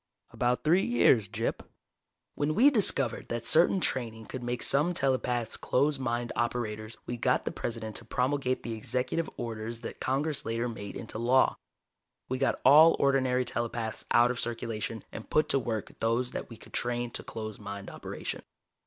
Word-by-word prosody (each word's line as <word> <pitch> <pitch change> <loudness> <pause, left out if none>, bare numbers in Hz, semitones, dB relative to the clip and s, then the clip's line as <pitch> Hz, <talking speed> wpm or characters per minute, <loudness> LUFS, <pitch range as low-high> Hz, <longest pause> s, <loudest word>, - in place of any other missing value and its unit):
"About 125 0 0
three 175 +5 +4
years, 120 - +3
Gyp. - - -2 0.7
When 150 +1 -1
we 275 +8 +6
discovered 200 - +2
that 120 0 -3
certain 175 +4 +4
training 115 -8 -2
could 130 - -6
make 120 0 -2
some 160 +6 +3
telepaths 125 -4 0
closed 140 +2 +1
mind 120 -2 -2
operators, 110 -2 -2
we 120 - -4
got - - +1
the - - -1
President 110 -2 -4
to 115 - -9
promulgate 130 +2 0
the 115 - -4
Executive 125 +8 -2
Orders 115 0 -5
that - - -7
Congress 140 +3 -1
later 115 +2 -1
made 100 -4 -7
into 110 -1 -5
law. 125 +3 +4 0.7
We 130 0 -2
got 135 - +1
all 155 +5 +8
ordinary 130 -2 +2
telepaths 115 -2 -3
out 120 +1 +5
of 125 - -4
circulation 115 -1 -3
and 110 - -9
put 155 - +2
to 135 - +3
work 115 -4 -3
those 115 +2 0
that - - -5
we 115 - -10
could - - -16
train 120 0 -1
to - - -4
closed 110 -2 -6
mind 100 -1 -7
operation. - - -5
120 Hz, 170 wpm, -29 LUFS, 115-135 Hz, 0.7 s, all